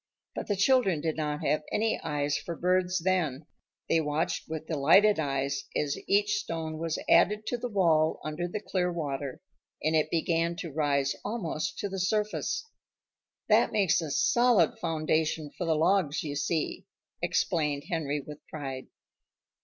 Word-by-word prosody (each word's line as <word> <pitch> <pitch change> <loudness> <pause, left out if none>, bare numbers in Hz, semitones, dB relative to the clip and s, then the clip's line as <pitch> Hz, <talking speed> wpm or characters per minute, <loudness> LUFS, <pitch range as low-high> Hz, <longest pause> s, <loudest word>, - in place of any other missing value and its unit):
But - - -5
the 205 - +1
children 200 - +3
did 160 +1 -2
not 150 -1 -2
have 155 - +2
any 220 +1 +1
eyes 145 -1 -1
for 170 - -4
birds 180 +1 +1
then. 165 -6 0 0.4
They 165 - +3
watched 155 +2 -2
with 160 0 -4
delighted 165 +7 +4
eyes 140 -1 -1
as 145 -1 0
each 205 +1 +3
stone 160 -4 -4
was 165 -1 -2
added 210 +2 +4
to 245 - -1
the 245 - -3
wall 165 -6 +2
under 155 +3 -3
the 205 +4 -4
clear 180 -3 -1
water, 140 -5 -4 0.4
and 160 +1 +2
it 155 - +2
began 170 0 0
to 170 -1 -6
rise 140 -2 +1
almost 200 -5 -3
to 205 - -2
the 195 -1 -5
surface. 210 - -1 0.8
"That - - +4
makes 195 -5 +2
a 160 - -4
solid 235 - +3
foundation 155 -1 0
for 180 - -3
the 160 - +3
logs, 165 -1 +2
you 145 -2 -4
see," 150 +2 -2 0.3
explained 150 -4 0
Henry 150 -4 -2
with 150 +2 -10
pride. 135 -4 -6
160 Hz, 155 wpm, -29 LUFS, 150-185 Hz, 0.8 s, delighted